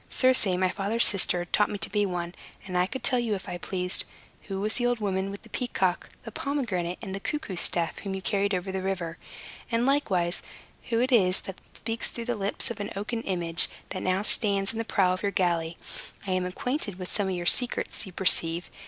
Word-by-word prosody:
Circe, 255 -4 +4
my 185 0 +2
father's 205 +5 +2
sister, 180 -3 +4
taught 210 +4 +2
me 205 - -3
to - - -2
be 205 -1 +2
one, 175 -1 -3 0.3
and 185 -2 -6
I 180 0 +3
could 265 - -6
tell 250 - +4
you, 230 -3 0
if 190 - -8
I 175 - -5
pleased, 180 0 +1 0.4
who 195 -2 -3
was 210 +2 +3
the 245 - +1
old 245 0 +1
woman 195 -2 -1
with 200 0 -8
the - - -16
peacock, 190 -7 -1
the 225 - -8
pomegranate, 210 -12 -2
and 195 -3 -5
the 195 - -3
cuckoo 295 -3 -3
staff, 170 -1 +2
whom 195 -1 -4
you 190 - -5
carried 200 -1 +1
over 185 +1 -3
the 190 0 -2
river; 180 -3 -3 0.5
and, 230 +1 +2
likewise, 195 -11 +1 0.5
who 230 -1 +2
it 255 +2 +1
is 185 -6 +4
that 195 - -9
speaks 225 0 -2
through 235 - -5
the 245 0 -1
lips 200 +2 -1
of 230 - -5
the 205 -1 -5
oaken 225 +3 -3
image, 175 -4 +3 0.2
that 185 +2 -1
stands 200 -3 +2
in 225 - -4
the - - 0
prow 185 -4 +2
of 185 - -4
your 200 - 0
galley. 170 -3 0 0.5
I 190 - -3
am 185 0 0
acquainted 205 +1 -2
with 180 -1 -7
some 205 -2 +1
of 185 - -1
your 175 -1 -4
secrets, 245 +7 +1
you - - -9
perceive. 170 -2 +3
195 Hz, 220 wpm, -27 LUFS, 180-225 Hz, 0.5 s, Circe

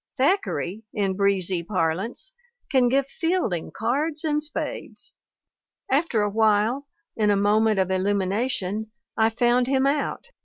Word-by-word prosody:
Thack 360 +10 +3
eray, 190 +6 -3
in 195 -2 0
breezy 190 -3 +1
parlance, 185 - -2 0.4
can 255 -3 +4
give 270 +2 +2
Fielding 325 - -1
cards 290 +8 -1
and 300 -1 +1
spades. 305 +1 -6 0.8
After 265 -6 +2
a 205 - +1
while, 220 +5 +2 0.3
in 210 -2 +2
a 205 - +4
moment 210 +2 +3
of 190 -1 +1
illumination, 200 +2 -1 0.3
I 220 0 +3
found 240 +2 +2
him 265 0 +2
out. 280 +1 -1
220 Hz, 130 wpm, -24 LUFS, 200-275 Hz, 0.8 s, can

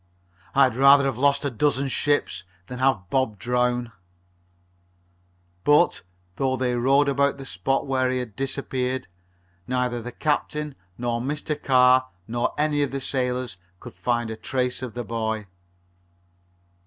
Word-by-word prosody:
"I'd 135 -4 +5
rather 140 +2 +6
have 135 -3 -1
lost 140 +1 +3
a 140 - 0
dozen 140 +3 +1
ships 145 -6 0 0.2
than 125 +5 -7
have 125 -9 +1
Bob 130 -6 +1
drown!" 125 +2 0 1.7
But, 150 +4 +4 0.4
though 130 -1 +1
they 125 -1 0
rowed 135 +4 +3
about 140 0 +2
the 135 - -8
spot 135 0 -1
where 130 -1 +1
he 130 - 0
had 120 -5 -5
disappeared, 130 -1 -2 0.6
neither 125 -1 -1
the 125 +2 -7
captain 150 0 -1 0.2
nor 120 -1 -1
Mr. 150 +3 -2
Carr 130 -1 +5 0.2
nor 120 +1 -1
any 150 0 +1
of 140 - +1
the 135 - -3
sailors 125 -5 -2 0.2
could 120 - -10
find 120 -2 -1
a - - -4
trace 125 +2 -2
of 125 -4 -6
the 120 - -3
boy. 110 -1 -2
130 Hz, 140 wpm, -24 LUFS, 120-140 Hz, 1.7 s, rather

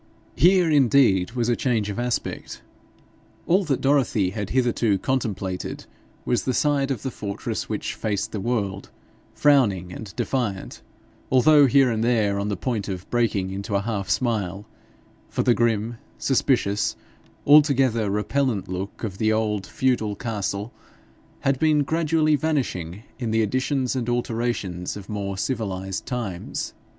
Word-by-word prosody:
Here, 180 0 +5
indeed, 125 - +4
was 120 -2 0
a 120 - +2
change 115 -6 0
of 100 - -5
aspect! 120 -1 -3 0.8
All 190 +4 +3
that 140 -5 0
Dorothy 130 -9 +2
had 105 -1 -4
hitherto 120 -5 +2
contemplated 95 -6 -3 0.4
was 120 -4 +1
the 130 - -1
side 145 -2 +1
of 130 -6 -3
the 130 - -3
fortress 100 -3 -4
which - - -3
faced 105 -2 -2
the 105 - -3
world 100 -4 -2 0.5
frowning 105 -12 +3
and 105 -1 -8
defiant, 110 -8 -2 0.5
although 145 +2 +6
here 135 -1 +4
and 110 0 -1
there 110 -4 +2
on 100 - -2
the 100 -2 -2
point 110 -2 -2
of 90 -2 -5
breaking 110 -6 +1
into 100 +1 -4
a 100 - +2
half 100 -3 -3
smile, 100 -2 -1 0.6
for - - -1
the 120 - +4
grim, 115 0 0 0.2
suspicious, 120 -6 +1 0.5
altogether 135 -7 +5
repellent 105 +2 0
look 95 +4 -5
of 100 -4 -4
the 110 0 +2
old 105 -3 0
feudal 120 -6 0
castle 105 -1 -3 0.7
had 135 -1 +1
been 155 -2 +3
gradually 155 0 +2
vanishing 115 - -2 0.2
in 120 -3 -2
the 110 0 +2
additions 130 +3 0
and 120 -2 -2
alterations 115 -7 -2
of 100 -1 -11
more 100 -2 -3
civilised 95 -5 -3
times. 110 -9 -4
115 Hz, 140 wpm, -24 LUFS, 100-130 Hz, 0.8 s, although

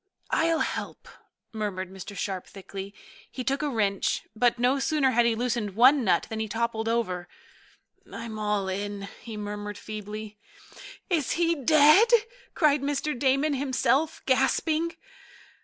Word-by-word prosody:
"I'll 325 -1 +2
help," - - -4 0.5
murmured 195 -4 -4
Mr. 195 +1 -9
Sharp 190 -3 -3
thickly. 195 0 -8 0.4
He 255 - -6
took 275 +3 -1
a 300 - 0
wrench, 205 -6 0
but 240 +1 +2
no 250 +3 +2
sooner 270 0 +2
had 235 0 +3
he 230 - +2
loosened 230 -4 -2
one 260 +4 +6
nut 190 - +2
than 220 - -5
he 220 - -2
toppled 225 0 -2
over. 185 -7 -1 0.8
"I'm 230 -1 -6
all 210 -2 0
in," 200 +1 -4
he 225 -2 -8
murmured 205 0 -5
feebly. 215 0 -7 0.7
"Is 330 -7 0
he 335 0 +2
dead?" 310 - +6 0.5
cried 295 -3 +3
Mr. 290 +2 -1
Damon, 275 +4 +1
himself 275 +2 0
gasping. 310 +5 +1
235 Hz, 140 wpm, -27 LUFS, 205-280 Hz, 0.8 s, one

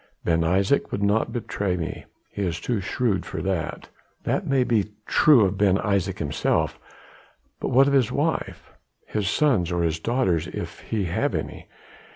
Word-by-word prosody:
Ben 85 -1 +2
Isaje 95 +10 +1
would 100 - -2
not 105 +2 +1
betray 100 -5 -2
me. 80 - -5 0.3
He 100 - -5
is 85 -3 -1
too 115 -5 -2
shrewd 105 0 0
for - - -6
that." 95 -4 -3 0.3
"That - - -1
may 135 -2 +3
be 105 -4 0
true 135 -9 +5
of 95 +1 -2
Ben 100 -2 +4
Isaje 100 -3 0
himself; - - -1 0.8
but - - -2
what 135 +2 +5
of 140 - +1
his 130 -5 +3
wife? - - -2 0.3
his 105 -3 -2
sons 120 - +2
or 85 -1 +1
daughters 115 -9 +1
if - - -6
he 110 -3 -2
have 85 - -1
any? - - -5
100 Hz, 165 wpm, -24 LUFS, 90-120 Hz, 0.8 s, true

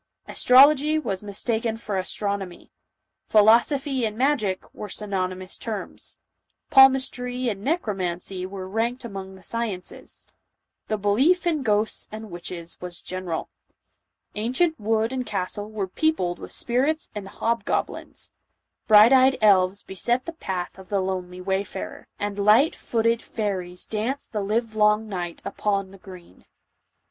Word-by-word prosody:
Astrology 285 +4 +6
was 200 -11 -2
mistaken 220 +2 -1
for 215 -3 -4
astronomy; 195 -1 -4 0.6
philosophy 240 +5 +4
and 215 -1 -2
magic 250 -8 +1
were 210 - -7
synony 190 -4 -2
mous 185 0 -7
terms; 215 -4 -5 0.5
palmistry 255 -2 +4
and 200 -3 -4
necromancy 190 - -2
were 190 -1 -7
ranked 230 +5 -2
among 195 -3 -7
the 190 - -16
sciences; 220 -6 -5 0.6
the 215 - -1
.belief 255 - +3
Ht 330 -4 +1
gkosts 215 -1 0
aud 215 -1 -8
witohea 170 -1 -7
was 180 -1 -4
general; 185 -3 -4 0.8
ancient 255 +10 0
wood 220 +2 +1
and 260 -1 -1
castle 205 +1 -3
were 210 -3 -3
peopled 185 - 0
wifli - - -8
spirits 275 +7 0
and 205 -2 -6
hobgoblins; 230 +3 -2 0.5
bright 215 +3 +8
eyed 265 0 +5
elves 195 -2 +4
beset 240 +7 -1
the 335 - -5
path 190 - -5
of 190 - -13
the 200 - +1
lonely 185 -1 -3
wayfarer; 190 +1 -4
and 205 0 -3
light 230 +10 +5
footed 230 0 0
fai 210 -2 -2
ries 180 -1 -6
danced 230 +6 -3
the 210 - -2
livelong 215 0 +1
night 175 -4 -5
upon 195 -2 -1
the 195 - -14
green. 180 - -14
210 Hz, 135 wpm, -24 LUFS, 190-240 Hz, 0.8 s, bright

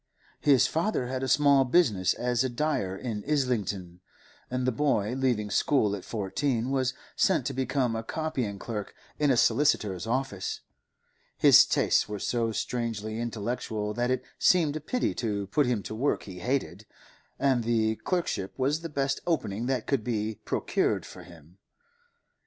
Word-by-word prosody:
His 140 -4 +5
father 165 -4 0
had 130 +1 -3
a 130 - -1
small 140 0 +5
business 120 - +2
as 125 0 0
a 130 - 0
dyer 125 -8 -1
in 110 -3 -4
Islington, 100 - -1 0.5
and 125 0 -2
the 130 - +2
boy, 115 -4 +1
leaving 125 -6 0
school 105 -4 +2
at 95 - -8
fourteen, 115 +4 -2
was 130 -1 0 0.2
sent 160 -10 +2
to 135 - -2
become 130 -2 0
a 115 - -2
copying 130 -6 -3
clerk 105 -1 -6 0.2
in 150 -1 +3
a 130 - +3
solicitor's 110 - +2
office; 120 -6 -2 0.8
his - - +7
tastes - - +2
were 105 - -3
so 115 +3 -1
strongly 110 -2 -3
intellectual 110 -2 -3
that 120 +2 -1
it 130 - 0 0.2
seemed 160 -5 +4
a 155 - -4
pity 250 - -1
to 105 -4 -2
put 135 +8 +1
him 115 -5 0
to - - -6
work 130 +7 0
he 95 -3 -9
hated, 110 -3 -2 0.5
and 130 -4 +2
the 110 -1 +1
clerkship 170 - -2
was 140 +4 0
the 165 - -5
best 140 -2 -1
opening 120 - -1
that 130 -1 -1
could 135 -6 0
be 110 -2 -2
procured - - 0
for 90 - -11
him. 85 +1 -16
120 Hz, 160 wpm, -28 LUFS, 105-135 Hz, 0.8 s, his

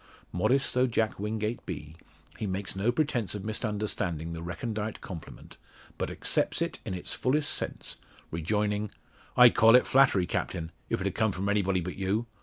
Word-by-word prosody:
Modest 130 +10 +2
though 125 +1 +3
Jack 110 -3 0
Wingate 110 +2 -2
be, 75 +1 -6 0.4
he 105 - -2
makes 95 +1 -2
no 100 +5 +2
pretence 125 -7 0
of 100 -1 -5
misunderstanding 105 -7 -2
the 80 - -6
recondite 105 +5 -4
compliment, 85 -6 -9 0.4
but - - -1
accepts - - +1
it - - -2
in 95 - -3
its 90 - -2
fullest 145 +3 +1
sense, - - -4 0.3
rejoining 105 +5 0 0.5
"I'd 125 -1 +9
call 115 +2 +7
it 125 - +6
flattery, 130 -9 +4
Captain, 80 -1 -3 0.2
if't - - 0
had - - 0
come 110 -1 +2
from 95 +2 -2
anybody 95 -3 +2
but 90 +2 -5
you. 100 +4 0
105 Hz, 165 wpm, -29 LUFS, 95-115 Hz, 0.5 s, I'd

